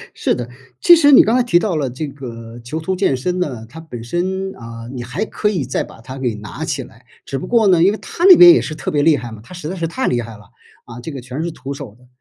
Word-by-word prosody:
是 - - 0
的， 120 -1 -6 0.3
其 345 - +8
实 290 -3 +5
你 265 - +9
刚 225 +3 +2
才 255 - +3
提 235 -8 +3
到 190 -2 -1
了 145 -4 -1
这 135 +5 -5
个 120 -4 -9
囚 135 +7 -5
徒 185 +4 -2
健 185 -7 +1
身 180 +8 -2
呢， 130 -10 -3
它 125 +8 -12
本 140 -8 -9
身 185 +9 -3
啊， 115 0 -9
你 125 -2 -5
还 130 - -3
可 210 -1 -1
以 175 -10 -2
再 130 - -2
把 - - -14
它 130 +3 -9
给 125 -3 -1
拿 105 -1 -8
起 - - -2
来， - - -18 0.2
只 135 - -4
不 - - -6
过 230 -3 +3
呢， 175 -3 +4
因 195 - +5
为 210 - -4
它 345 - -6
那 370 -2 +9
边 350 -1 +10
也 - - +3
是 155 - -5
特 150 - -5
别 145 - +1
厉 160 -2 +4
害 120 -3 -7
嘛， 110 -1 -10
它 150 - -14
实 180 -4 -7
在 180 - -4
是 170 -3 -3
太 255 +11 -2
厉 120 -1 +1
害 115 -2 -9
了， 105 - -19 0.4
啊， 120 - -10
这 160 - -7
个 135 - -7
全 130 +5 -6
是 170 - -3
徒 140 -1 -7
手 135 -6 -9
的， 125 - -22
145 Hz, 315 characters per minute, -18 LUFS, 120-185 Hz, 0.4 s, 边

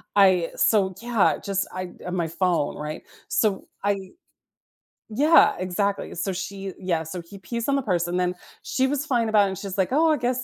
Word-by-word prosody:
I 185 -4 +5
so, 195 -4 +3
yeah, 235 -3 +2
just 195 -1 -1
I, 185 -1 -5
uh, - - -5
my 175 -2 -1
phone, 170 -2 0
right? 150 +1 -6 0.2
So, 205 -4 0 0.2
I 200 -2 -1 1.0
Yeah, 295 +9 +5
exactly, 195 +2 -2
so 195 - -2
she 195 +1 -5
Yeah, 175 -4 -1
so 170 +3 -6
he 170 +4 -13
pees 230 +5 -4
on 280 - +2
the 275 - +1
purse, 180 -8 0
and 175 +1 -1
then 180 0 +1 0.3
she 260 0 0
was 290 +1 -1
fine 240 -6 +1
about 215 -2 +4
it, - - -1
and 190 - -5
she's 195 0 -5
like, 190 +2 +1
"Oh, 320 +4 +4
I 305 - +2
guess," 250 0 -1
195 Hz, 200 wpm, -24 LUFS, 180-230 Hz, 1.0 s, I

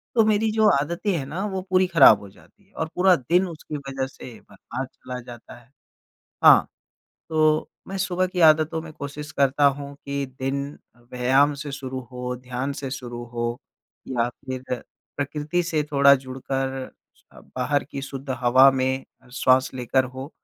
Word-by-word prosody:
तो 225 - +5
मेरी 215 +1 +2
जो 215 0 +3
आदतें 170 +7 -2
हैं 140 - -4
ना 165 +8 -4
वो 190 -2 -3
पूरी 185 0 +3
ख़राब 165 - +7
हो 100 - -11
जाती 195 - -23
है 200 - -33
और 160 0 -3
पूरा 180 0 +5
दिन 175 +8 +1
उसकी 155 -2 -7
वज़ह 135 -1 -4
से 130 -2 -11 0.2
बर्बाद 130 - -6
चला 125 0 -7
जाता 120 -1 -12
है। 120 - -24 0.7
हाँ, - - +8 0.6
तो 155 -1 +2 0.2
मैं 195 0 -4
सुबह 185 0 0
की 185 -1 -4
आदतों 160 0 +5
में 160 - -10
कोशिश 145 0 -7
करता 140 +1 +2
हूँ 140 0 -8
कि 140 0 -2 0.2
दिन 135 +1 -1 0.5
व्यायाम 135 +4 +3
से 145 - -6
शुरू 130 -1 -5
हो, 125 0 -4
ध्यान 125 +2 -4
से 135 -1 -6
शुरू 120 -2 -6
हो 120 0 -2 0.5
या 120 -2 0
फिर 130 +1 -7 0.5
प्रकृति 150 +4 -1
से 160 -3 0
थोड़ा 140 0 +7
जुड़कर, 135 0 -4 0.3
स - - -30 0.3
बाहर 145 +3 0
की 140 - -7
शुद्ध 135 0 -8
हवा 130 +2 +7
में 130 0 -1 0.3
श्वास 130 0 +3
लेकर 130 +1 +1
हो, 130 +3 -8
140 Hz, 165 wpm, -24 LUFS, 130-160 Hz, 0.7 s, हाँ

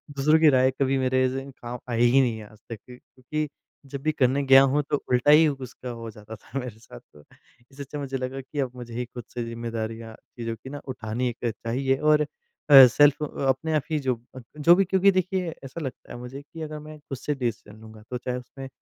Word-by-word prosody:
दूसरों 155 +3 +4
की 160 -1 +6
राय 130 -1 +4
कभी 135 0 0
मेरे 130 0 +2
एज़ 130 +1 -1
इन 135 +1 -6
काम 125 -1 -8
आई 115 0 0
ही 135 +2 +6
नहीं 120 -4 0
है 105 -1 -10
आज 110 - -18
तक 115 - -5
क्योंकि 130 +4 -6 0.4
जब 135 0 -7
भी 155 +2 +1
करने 135 -2 +2
गया 135 0 +8
हूँ, 135 +2 +2
तो - - +2
उल्टा 125 +3 +4
ही 155 +1 +7
उसका 130 -3 -6
हो 115 -1 -7
जाता 105 +1 -11
था 125 +5 -7
मेरे 120 -4 -7
साथ 105 - -13
तो 75 - -21 0.5
इससे 140 +1 -8
अच्छा 145 +2 -7
मुझे 135 -1 -3
लगा 130 +1 -4
कि 145 +2 -7
अब 130 -3 -1
मुझे 120 -2 -9
ही 125 +1 -3
खुद 120 0 -9
से 120 - -3
ज़िम्मेदारियाँ 115 -1 -5 0.2
चीज़ों 115 -1 -4
की 115 +4 -12
ना 145 +1 -7
उठानी 120 -1 -3
एक 120 0 -7
चाहिए 130 +4 -1
और 150 +1 +3 0.5
अ, 135 -2 +11
सेल्फ 145 +4 +4
अ, - - -1 0.2
अपने 145 +5 0
आप 155 - +2
ही 155 - +1
जो 130 -3 0 0.2
अ, - - -7 0.2
जो 165 +4 +6
भी 195 +1 +3
क्योंकि 190 +1 +4
देखिए 185 -2 -1
ऐसा 135 +5 -7
लगता 135 -3 -7
है - - -7
मुझे 125 +3 -8
कि 160 +3 -12
अगर 155 -1 -5
मैं 155 0 -10
खुद 140 -2 -7
से 150 +4 -3
डिसीज़न 115 -5 -4
लूँगा, 110 -1 -13
तो 125 - -3
चाहे 125 0 -4
उसमें 135 +2 -9
130 Hz, 235 wpm, -25 LUFS, 120-145 Hz, 0.5 s, अ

